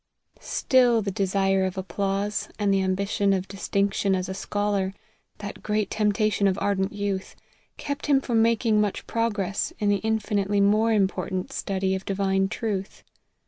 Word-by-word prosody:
STILL 245 -4 +3
the 200 - -2
desire 195 -1 +1
of 185 0 -2
applause, 195 +2 -2
and 205 -2 +2
the 195 - +2
ambition 195 +1 +1
of 190 0 -1
distinction 200 0 0
as 185 -1 -2
a 190 - -4
scholar, 200 -1 -1 0.4
that 205 -1 -7
great 210 -1 -1
temptation 210 -1 +2
of 190 0 +1
irdent 200 -1 0
youth, 200 -2 -3 0.4
kept 285 0 -4
him 280 -2 +5
from 235 -4 +1
making 225 -1 +3
much 205 -2 -2
progress 205 -4 -1
in 205 - 0
the 205 - +3
infinitely 205 -1 0
more 215 +3 +3
important 190 -3 0
study 190 -1 -1
of 190 0 -3
divine 195 0 0
truth. 205 -3 -4
200 Hz, 150 wpm, -25 LUFS, 195-210 Hz, 0.4 s, him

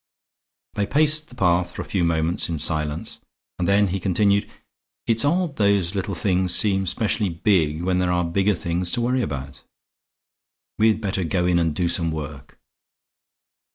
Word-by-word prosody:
They 100 - -2
paced 155 +1 +4
the 125 - -15
path 90 -4 +1
for - - -5
a - - -14
few 95 -3 -1
moments 85 +1 0
in 85 - -2
silence 75 0 -1 0.4
and 90 - -1
then 100 0 +3
he 95 +2 -2
continued. 100 +2 +1 0.6
"It's 115 -1 +1
odd 165 0 0
those 100 -4 +1
little 95 -1 -3
things 90 +1 0
seem 95 -3 +3
specially 105 0 -1
big 85 -3 0
when 90 0 0
there 90 -1 0
are 90 0 0
bigger 95 +4 +1
things 85 +1 -2
to 120 - 0
worry 125 +2 0
about. 70 - -6 1.2
We'd 110 0 +3
better 95 -3 -2
go 90 +1 -1
in 90 -1 +2
and 80 -3 -1
do 90 +1 0
some 85 -1 -1
work." 75 -3 -7
90 Hz, 165 wpm, -22 LUFS, 85-105 Hz, 1.2 s, paced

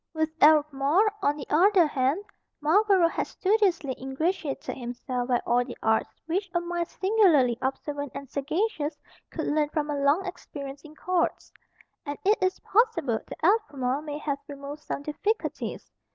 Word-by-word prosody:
With 315 0 0
Albemarle, 300 +6 +4
on 295 -4 +1
the 280 - -6
other 365 +3 +5
hand, 285 +5 0 0.4
Marlborough 375 +3 +4
had - - -2
studiously 370 - +1
ingratiated 285 +3 -2
himself 245 0 -4
by 245 -2 +2
all 245 +1 +3
the 245 -1 -9
arts 220 0 +2 0.2
which 370 +4 -2
a - - +4
mind 345 0 -3
singularly 365 - +3
observant 285 +1 -3
and 280 - -6
sagacious 300 - -2 0.3
could 315 - -4
learn 295 0 +1
from 300 -1 -2
a 290 - -2
long 290 +7 +3
experience 280 -6 -7
in 310 0 -14
courts; 360 +1 -1 0.5
and 290 -2 -5
it 415 +1 +3
is 370 0 +1
possible 360 - +2
that - - -5
Albemarle 285 - +1
may 295 -1 -5
have 285 -2 -3
removed 285 +1 -8
some 285 - -5
difficulties. 410 +9 -3
300 Hz, 150 wpm, -27 LUFS, 275-365 Hz, 0.5 s, other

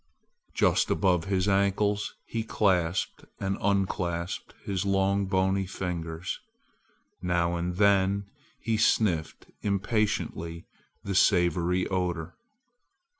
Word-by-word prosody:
Just - - +3
above 90 -4 +2
his 95 -1 0
ankles 100 +1 +1
he 115 - -3
clasped 95 -5 0
and 95 0 -1
unclasped 95 -3 -1
his 95 -3 -1
long 100 0 +1
bony 95 0 +1
fingers. 85 -2 -4 0.8
Now 85 -1 +1
and 85 +1 -2
then 100 0 +3 0.3
he 110 0 0
sniffed 100 -7 +1 0.2
impatiently 100 -5 -1 0.4
the 100 - -3
savory 90 -2 +3
odor. 90 -3 -2
95 Hz, 95 wpm, -28 LUFS, 90-100 Hz, 0.8 s, Just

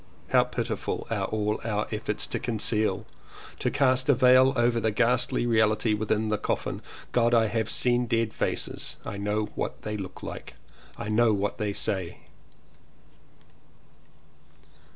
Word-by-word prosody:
How - - +5
pitiful - - -3
are - - 0
all 105 0 -1
our 105 -2 -1
efforts 105 -1 -2
to - - -3
conceal, 110 -2 0 0.5
to - - 0
cast 130 -1 +2
a 140 - +6
veil 130 +1 +6
over 120 -1 +2
the 110 - +1
ghastly 120 +3 +1
reality 110 -1 +2
within 110 +1 0
the 105 -1 0
coffin. - - -2 0.3
God! 120 0 +3
I 115 -1 +4
have 110 +1 -1
seen 120 0 +1
dead 115 -1 0
faces. - - -3
I 100 - -5
know 105 +1 -1
what - - -4
they 105 0 -3
look 95 -2 -8
like. - - -7 0.4
1 105 +1 -3
know 115 -1 +4
what 100 +2 -2
they 105 -2 -1
say. 95 -3 -2
110 Hz, 145 wpm, -27 LUFS, 105-120 Hz, 0.5 s, a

